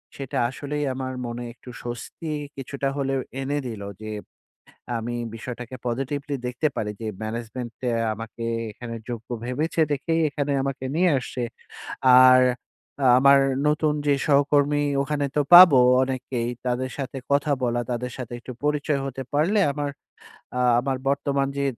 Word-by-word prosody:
সেটা 135 -2 -5
আসলেই 145 +3 -4
আমার 130 0 -4
মনে 120 +1 -5
একটু 125 +1 -14
স্বস্তি 120 +6 -6 0.3
কিছুটা 135 +1 -3
হলেও 135 -1 0 0.2
এনে 145 +2 -1
দিলো। 105 -4 -6
যে 110 0 -6 0.9
আমি 120 +1 -4 0.2
বিষয়টাকে 120 +1 -7
Positively 140 +4 -2
দেখতে 125 +5 -1
পারি 105 - -2
যে 110 - -4 0.2
Management 115 +2 -5 0.2
এ - - 0 0.2
আমাকে 115 +2 -8 0.3
এখানে 115 +2 -7 0.2
যোগ্য 115 -2 -6 0.2
ভেবেছে 150 +7 -1
দেখেই 165 +4 0
এখানে 145 +1 -2
আমাকে 135 -1 -3
নিয়ে 180 +1 +4
আসছে। 125 0 -5 0.8
আর 130 0 +8 0.6
আ - - +5
আমার 140 +1 +7 0.3
নতুন 150 0 +2
যে 145 - +5
সহকর্মী 145 0 +3 0.2
ওখানে 145 0 -1
তো - - +4
পাবো 175 -6 +11 0.2
অনেকেই 130 -2 -2 0.2
তাদের 125 +1 -1
সাথে 135 -1 -4
কথা 145 +1 +2
বলা, 120 0 0
তাদের 125 +1 -3
সাথে 125 -1 -6
একটু 125 - -8
পরিচয় 150 -1 +1
হতে 135 0 -5
পারলে 170 +9 +2
আমার 145 0 -3 0.7
আ - - +1 0.2
আমার 135 +1 -1
বর্তমান 140 0 0
যে 140 - +1
135 Hz, 145 wpm, -24 LUFS, 120-145 Hz, 0.9 s, পাবো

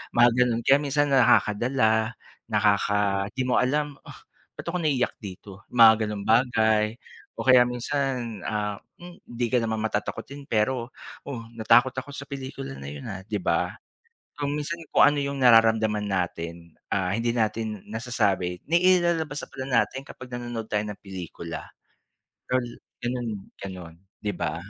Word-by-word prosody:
mga 120 0 +7
ganon. 120 -1 0
Kaya 140 +1 +5
minsan, 145 0 +1
nakakadala 115 -2 +3 0.3
nakaka 100 -2 +2
di 130 - 0
mo 125 - +1
alam, 145 +2 0
"Ugh, - - -13 0.4
ba't - - -8
ako 180 - -1
naiiyak 140 -6 0
dito?" 100 -1 -10
Mga 110 -2 +7
ganong 105 -1 -5
bagay 110 -2 +3 0.4
o - - -5
kaya 125 -1 +7
minsan, 125 -2 -2
ah, 105 -1 -2 0.2
hmm, 175 0 -11
hindi 120 0 -2
ka 125 - +4
naman 110 -1 -2
matatakotin 125 +6 -4
pero, 120 +1 0 0.3
"Oh 130 -5 -5 0.2
natakot 120 +4 +5
ako 130 +2 -7
sa 140 - -6
pelikula 130 - -6
na 70 - -9
'yon, 70 0 -7
ah," 95 -1 -7
'di 105 -2 -3
ba? - - 0 0.6
So, 145 - -2
minsan 150 +4 -3
kung - - +5
ano 145 - -1
yung 140 -1 -3
nararamdaman 110 -3 +5
natin, 85 -3 -4 0.2
ah, 95 -2 0
hindi 115 +3 0
natin 110 -2 -1
nasasabi 105 -6 -1
nailalabas 170 -4 +3
na - - -7
pala 130 - -6 0.2
natin 135 +1 -4
kapag 130 -2 -11
nanonood 120 -2 -5
tayo 105 0 0
ng 105 -1 -7
pelikula, 85 -4 -7 0.8
ol 130 -1 +1 0.4
gano'n 120 -1 -2 0.3
gano'n, 90 -4 -8 0.3
'di 105 - 0
ba? 80 - -2
115 Hz, 150 wpm, -26 LUFS, 105-130 Hz, 0.8 s, mga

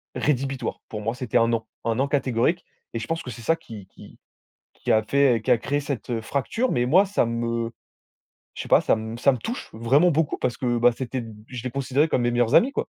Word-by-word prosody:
rédhibitoire. 135 -2 -1
Pour 105 -1 -5
moi, 115 +2 -2
c'était 125 -3 -1
un 115 - +4
non, 115 -1 -1 0.2
un 115 -1 +1
non 135 +4 +1
catégorique. 135 +4 0 0.3
Et 115 - -2
je 115 - -5
pense 165 0 -2
que - - -7
c'est 115 - -9
ça 165 - +3
qui 110 - -11
qui - - -15 0.6
qui - - -5
a 110 0 +4
fait, 130 0 +3
qui - - -1
a 120 - +4
créé 145 +4 -1
cette, 140 -6 -5
heu, 115 -2 -1
fracture. 145 - -1
Mais 120 - +1
moi, 185 +9 +5
ça 195 -9 +1
me 115 0 -2 0.8
je - - -5
sais - - -9
pas, - - +6
ça - - +1
m 110 +1 -5
ça 140 - +4
me 130 - -3
touche 235 - -5
vraiment 135 +10 +3
beaucoup 160 -1 +1
parce 120 - -1
que 120 -2 0
bah, 120 +1 +5
c'était 130 -1 -4
d 115 -1 -9 0.2
je 125 -2 -7
les 125 - -2
considérais 140 +4 +1
comme 130 - +1
mes 120 - +2
meilleurs 120 -1 +1
amis, 265 +4 +5
quoi. - - -2
125 Hz, 245 wpm, -24 LUFS, 115-140 Hz, 0.8 s, pas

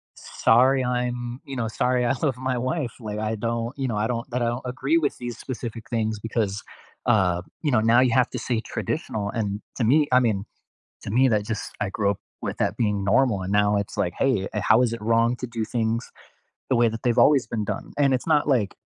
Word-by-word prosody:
"Sorry, 130 +3 +3
I'm" 125 0 -2
You 135 - -6
know, 115 -2 -1
"Sorry, 125 +2 +1
I 120 - +2
love 135 -5 0
my 130 -1 -1
wife." 130 0 -2
Like, 105 -1 -4
I 110 +1 -1
don't 115 +3 -3
you 135 -2 -1
know, 110 - -2
I 105 +1 +1
don't 120 +1 -3
that 125 +1 -1
I - - +2
don't 120 +2 -2
agree 130 +5 0
with 150 -4 0
these 120 -1 -6
specific 115 -3 -7
things 110 -2 -1
because, 110 -2 -2 0.4
uh, 90 -4 +3 0.2
you 150 - +1
know, 120 - +4
now 115 +2 +5
you 125 -2 +3
have 125 0 +3
to - - -4
say 120 -3 -1
"traditional." 110 - -3
And 105 -2 -3 0.2
to 125 - 0
me 145 +6 +4
I 125 - +6
mean, 105 -5 0 0.6
to - - -6
me, 130 +3 +4
that 105 -3 +1
just 110 -1 -4
I 105 - 0
grew 100 0 0
up 100 - -3 0.2
with - - -4
that - - 0
being 105 -4 0
normal, 105 0 +2
and 95 +2 -3
now 105 0 +3
it's 100 0 -3
like, 95 -5 -1
"Hey, 110 -8 +1
a 105 - -1
how 110 +5 +4
is 120 -2 +1
it 115 - -5
wrong 115 +2 +2
to 125 - -5
do 115 -2 -3
things 115 +1 -2 0.6
the 130 - +3
way 120 -1 +4
that 115 +1 -7
they've 120 -2 +1
always 145 -4 +5
been 110 -2 -2
done?" - - -5
And 140 -2 +3
it's 130 - -2
not 150 -2 +3
like, 120 -9 +1
115 Hz, 235 wpm, -24 LUFS, 110-125 Hz, 0.6 s, I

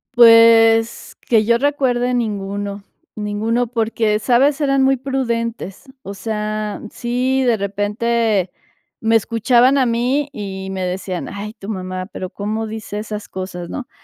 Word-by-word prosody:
Pues, 230 -1 +5
que 225 -3 +4
yo 235 +2 +3
recuerde 250 -3 0
ninguno, 200 -3 -3 0.3
ninguno 215 +3 -1
porque, 225 -2 0
¿sabes? 270 +6 +2
eran 275 -1 +2
muy 265 0 +4
prudentes, 235 -6 -3 0.2
o 200 - -6
sea, 215 0 -4
sí, 255 +3 -1
de 240 -3 +2
repente, 205 0 0 0.5
me 225 0 +4
escuchaban 240 +4 +3
a 265 - +3
mí 250 +5 0
y 195 -6 -6
me 190 -1 -3
decían: 180 0 -4
"Ay, 205 +2 -6
tu 195 - -9
mamá, 185 -3 -4
pero, 185 - -5
cómo 215 +3 -3
dice 220 -1 -6
esas 210 -1 -6
cosas", 185 -2 -6
¿no? 270 - -6
225 Hz, 135 wpm, -19 LUFS, 205-245 Hz, 0.5 s, Pues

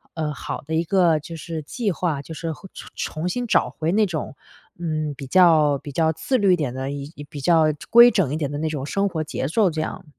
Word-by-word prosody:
呃， 155 -2 -2
好 130 - -6
的 160 - -4
一 165 - +2
个， 170 -3 +3
就 165 +3 -9
是， 160 0 -5
计 215 - -2
划。 160 -5 -2
就 160 - -9
是 165 +1 -4
会 190 - -13
重 - - -10
重 160 +3 -3
新 245 +6 -2
找 - - +2
回 160 +1 -2
那 215 0 +4
种， 155 -6 -4 0.4
嗯， 155 -3 -2
比 135 -1 -8
较 155 -5 +5
比 145 - -9
较 160 +3 +2
自 250 - 0
律 195 -4 +4
一 - - +5
点 145 -7 -2
的 130 +1 -4
一 145 +1 -7
比 145 -3 -8
较 165 +1 +4 0.2
规 235 +1 +9
整 175 -10 +1
一 - - -1
点 145 -3 -2
的 145 - -4
那 160 +2 -2
种 145 -3 -4
生 200 +7 0
活 160 -3 -3
节 155 - -3
奏 195 +4 +2
这 160 -1 -4
样。 - - -5
160 Hz, 265 characters per minute, -23 LUFS, 150-180 Hz, 0.4 s, 规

